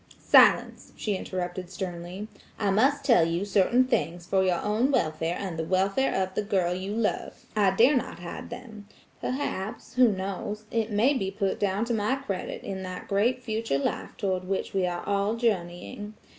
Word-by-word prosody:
"Silence!" - - +4
she 210 -2 -1
interrupted 180 -1 -4
sternly. 180 +2 -5 0.3
"I 205 -2 +1
must 275 +8 +3
tell 235 -11 +6
you 170 +4 0
certain 205 +5 +4
things 175 - -1
for 190 +1 +2
your 180 -2 +2
own 215 +6 +1
welfare 165 - 0
and 180 -5 -4
the - - 0
welfare 195 +9 +1
of 190 0 -5
the - - 0
girl 190 -4 +1
you 190 +2 -4
love. 225 -2 -2
I 205 -2 +4
dare 250 +8 +6
not 250 - -2
hide 175 0 -7
them. 220 -5 -9 0.3
Perhaps–who 245 -1 0
knows–it 210 +4 -3
may 225 +7 +3
be 195 -8 -1
put 195 -1 -1
down 200 +2 +1
to 235 - -1
my 220 +4 +1
credit 200 -9 -5
in 190 -1 -5
that 185 -1 -6
great 235 +6 +1
future 220 - -1
life 140 - -3
toward 185 -2 -1
which 195 0 -2
we 190 -2 +1
are 175 0 -3
all 200 +2 +1
journeying. 205 0 -2
200 Hz, 170 wpm, -27 LUFS, 185-225 Hz, 0.3 s, tell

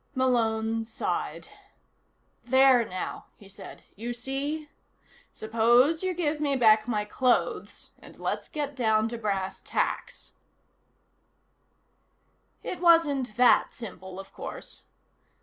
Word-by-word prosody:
Malone 225 -3 +1
sighed. 225 - -4 0.9
"There, 260 0 +5
now," 185 -4 -6
he 200 - -16
said. 195 - -12
"You 235 +4 -5
see? 275 +5 -4 0.6
Suppose 240 +8 +3
you 370 -1 -1
give 310 -3 -1
me 285 -2 0
back 220 -3 +4
my 210 -3 -1
clothes 250 +4 -1
and - - -15
let's - - -3
get 290 -2 -4
down 220 -3 +2
to 235 0 -6
brass 195 -3 -3
tacks." - - -3 2.3
It 365 - -5
wasn't 295 -9 +3
that 250 0 +4
simple, 190 -5 -9
of 195 - -11
course. - - -8
240 Hz, 110 wpm, -27 LUFS, 220-280 Hz, 2.3 s, There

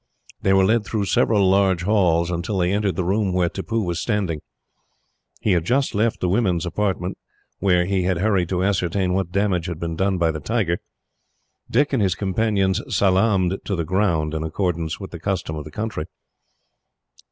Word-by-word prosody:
They 95 - +2
were 95 -1 +5
led 110 +2 +2
through 105 -1 -2
several 100 +1 +3
large 95 -2 +3
halls, 90 -4 +2
until 85 +4 -2
they 90 0 +1
entered 100 -3 0
the 90 - -1
room 95 +1 0
where 90 -1 +2
Tippoo 115 +4 -2
was 85 -2 -2
standing. 95 -9 -1 1.0
He 105 - +1
had 85 -3 +2
just 130 +8 +1
left 110 +2 0
the 90 - +1
women's 90 -3 +1
apartment, 90 0 -2 0.4
where 90 -3 +3
he 95 0 0
had 90 0 0
hurried 95 -2 +1
to 90 -1 0
ascertain 95 -1 0
what 95 -2 -1
damage 95 -3 0
had 85 -3 -5
been 85 -1 -3
done 95 +2 +1
by 85 -2 +2
the 80 - -5
tiger. 95 -2 -1 0.9
Dick 145 +4 +2
and 130 - +2
his 95 -4 +2
companion 100 0 +1
salaamed 95 -1 +1
to 100 - -2
the 85 -2 -2
ground, 85 -4 0
in 80 - -2
accordance 80 0 -2
with 95 - -8
the 85 - -7
custom 90 -3 -2
of 75 -1 -6
the - - -8
country. 105 -5 -4
95 Hz, 185 wpm, -22 LUFS, 85-100 Hz, 1.0 s, were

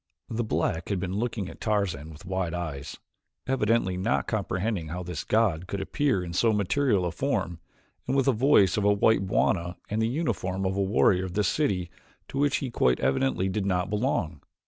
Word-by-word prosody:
The 115 +1 -1
black 85 -6 -1
had 100 -3 0
been 90 0 -3
looking 110 -4 -2
at - - -11
Tarzan 100 -9 -1
with 80 +3 -12
wide 95 -2 -2
eyes, 75 -5 -5 0.5
evidently 115 -7 +1
not 100 +6 0
comprehending 100 -3 -2
how 90 +3 -5
this 85 -3 -5
god 95 -6 +1
could 100 - -3
appear 100 0 0
in 85 -1 -6
so 115 +5 +3
material 105 0 +1
a 85 - -1
form, 95 - -2 0.5
and 130 - 0
with 135 - +3
the 135 - +5
voice 115 -6 +4
of 105 - +1
a 105 - +5
white 100 -1 +3
bwana 85 -1 +1 0.2
and 110 +1 0
the 110 - +2
uniform 95 - -2
of 95 0 0
a 100 - 0
warrior 95 -2 +3
of 90 - -6
this 105 -1 +2
city 95 - 0 0.4
to 135 - -3
which 145 -1 +3
he 125 - -5
quite 65 - +2
evidently 95 - +1
did 95 +1 -1
not 90 0 0
belong. 105 - -1
95 Hz, 195 wpm, -27 LUFS, 90-110 Hz, 0.5 s, the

